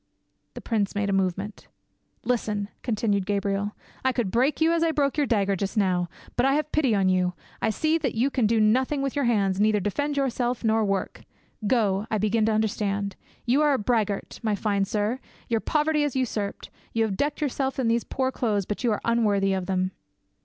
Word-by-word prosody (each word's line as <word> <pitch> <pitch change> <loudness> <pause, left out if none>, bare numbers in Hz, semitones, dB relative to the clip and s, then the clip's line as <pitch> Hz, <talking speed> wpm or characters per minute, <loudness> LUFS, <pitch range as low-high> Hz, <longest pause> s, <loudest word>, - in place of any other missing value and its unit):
The - - -7
prince 210 -4 -1
made 205 0 0
a - - +1
movement. 195 +2 -2 0.6
"Listen," 210 -4 -1
continued 210 -4 0
Gabriel: 200 0 -1 0.3
"I 260 - +3
could 240 -7 -1
break 260 +6 +2
you 325 +1 +4
as 335 - +1
I 330 - +3
broke 280 -3 +1
your 295 -2 +1
dagger 200 -4 +2
just 195 +3 -3
now; 180 -3 +1 0.3
but 245 - +2
I 270 +1 +4
have 305 0 -1
pity 270 -8 +2
on 195 -2 +2
you. 180 -1 +2 0.3
I - - +2
see 315 +9 +1
that 270 -7 -2
you 255 +5 +1
can 245 -6 +2
do 225 +1 +2
nothing 260 +6 +2
with 275 0 -2
your 285 -2 +1
hands, 200 -5 +2
neither 215 0 +3
defend 285 +9 -2
yourself 250 -3 0
nor 220 0 +3
work. 195 -2 -2 0.5
Go, 210 -3 +1
I 215 - +1
begin 215 +1 +1
to - - +3
understand; 205 -2 -1 0.3
you 255 +5 +3
are 295 -1 +4
a - - +2
braggart, 210 -3 -1
my 215 -3 0
fine 200 -1 0
sir; 210 +5 -1 0.3
your 230 -2 +1
poverty 300 +4 +1
is 290 -3 0
usurped; 220 -6 -2 0.2
you 225 - +2
have 210 -3 -1
decked 290 +8 -1
yourself 270 -2 -1
in 260 -3 0
these 230 +1 +2
poor 260 0 -1
clothes, 210 -7 0
but 210 +6 -4
you 240 - +2
are 210 - -1
unworthy 205 -4 +2
of 185 -2 -2
them." 185 0 0
220 Hz, 205 wpm, -26 LUFS, 200-260 Hz, 0.6 s, you